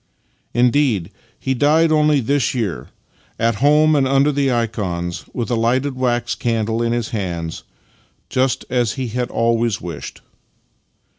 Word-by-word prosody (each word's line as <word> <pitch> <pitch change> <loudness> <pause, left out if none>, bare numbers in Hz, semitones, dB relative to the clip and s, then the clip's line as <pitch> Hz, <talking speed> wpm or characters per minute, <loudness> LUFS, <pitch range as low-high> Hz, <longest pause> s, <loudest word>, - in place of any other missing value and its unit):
Indeed, 120 - +2 0.3
he 130 - -1
died 155 +5 +3
only 150 -2 +3
this 135 0 0
year 100 - -3 0.3
— - - -35
at 115 -1 +1
home 150 +2 +5
and 135 -2 +2
under 135 +2 +3
the 140 -2 +1
ikons, 100 -8 -2
with 120 0 -3
a - - +2
lighted 130 +4 0
wax 120 -2 0
candle 115 -1 -1
in 115 0 0
his 120 -1 -1
hands, 85 -7 -4 0.7
just 130 0 0
as 120 -3 0
he 130 -3 -4
had 125 +2 -2
always 115 -1 +1
wished. 85 -1 -8
120 Hz, 145 wpm, -19 LUFS, 115-135 Hz, 0.7 s, home